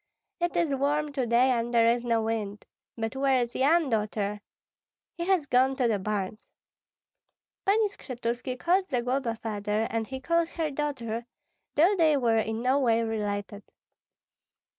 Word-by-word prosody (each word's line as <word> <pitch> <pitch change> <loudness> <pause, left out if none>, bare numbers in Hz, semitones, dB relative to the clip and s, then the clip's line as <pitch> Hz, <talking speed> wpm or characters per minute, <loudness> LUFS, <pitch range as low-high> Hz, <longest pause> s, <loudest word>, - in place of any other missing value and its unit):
"It 345 0 -1
is 330 -5 +1
warm 290 +2 0
to 260 -4 -1
day, 245 +3 +4
and 235 -1 0
there 230 -1 +4
is 240 0 -1
no 230 -2 +1
wind. 215 -2 -3 0.3
But 225 +2 -3
where 270 -1 +2
is 240 0 -2
Yan, 305 +3 +3
Daughter?" 210 -1 -1 0.7
"He 340 - -4
has 375 -6 +2
gone 260 0 +3
to 255 -2 +1
the 215 -3 +1
barns." 205 +1 -3 1.3
Pani 425 +2 +4
Skshetuski 250 - -4
called 370 +6 +1
Zagloba 250 -1 -1
father, 210 0 -2
and 225 -1 -1
he 265 0 -5
called 335 +4 +1
her 320 -3 -2
daughter, 245 -6 -3 0.5
though 350 +7 +5
they 315 -5 +4
were 230 -4 +2
in 220 +1 -2
no 260 +3 +3
way 230 -3 +2
related. 205 -2 -3
245 Hz, 155 wpm, -28 LUFS, 225-290 Hz, 1.3 s, though